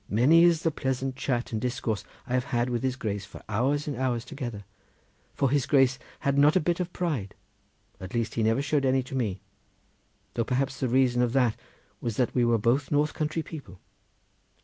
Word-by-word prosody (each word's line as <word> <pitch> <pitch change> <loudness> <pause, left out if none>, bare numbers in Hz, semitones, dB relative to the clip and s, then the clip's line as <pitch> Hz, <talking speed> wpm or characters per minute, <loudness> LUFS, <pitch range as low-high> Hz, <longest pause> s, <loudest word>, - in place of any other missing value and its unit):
Many 145 +11 +5
is 170 -2 +3
the 165 - +2
pleasant 130 -2 -2
chat 125 -2 -2
and 110 -2 -2
discourse 120 -4 -2 0.2
I 125 - -5
have 125 -1 +1
had 120 -1 0
with 120 -1 -1
his 130 -1 0
Grace 105 -5 -3
for - - -12
hours 135 +8 0
and 145 - -2
hours 125 -3 -1
together, 120 -9 -6 0.7
for 135 -2 +1
his 145 -2 +1
Grace 135 -2 +4 0.2
had 140 0 +1
not 150 +3 +5
a - - +6
bit 175 +2 0
of 180 -1 -2
pride, 145 - -2 0.6
at 95 +4 -7
least 115 -1 -1
he 115 - -1
never 115 +5 +2
showed 145 -1 +1
any 130 0 +2
to 130 - -11
me, 105 -8 -1 0.9
though, 115 - 0
perhaps, 130 +3 -1
the 130 - 0
reason 125 -1 +3
of 120 -1 +1
that 125 -4 +3 0.4
was 115 -3 -3
that 125 - +1
we 125 - +2
were 120 -1 +3
both 120 +6 +1
north 145 0 +2
country 155 +1 -2
people. 125 - -10
130 Hz, 200 wpm, -27 LUFS, 120-145 Hz, 0.9 s, a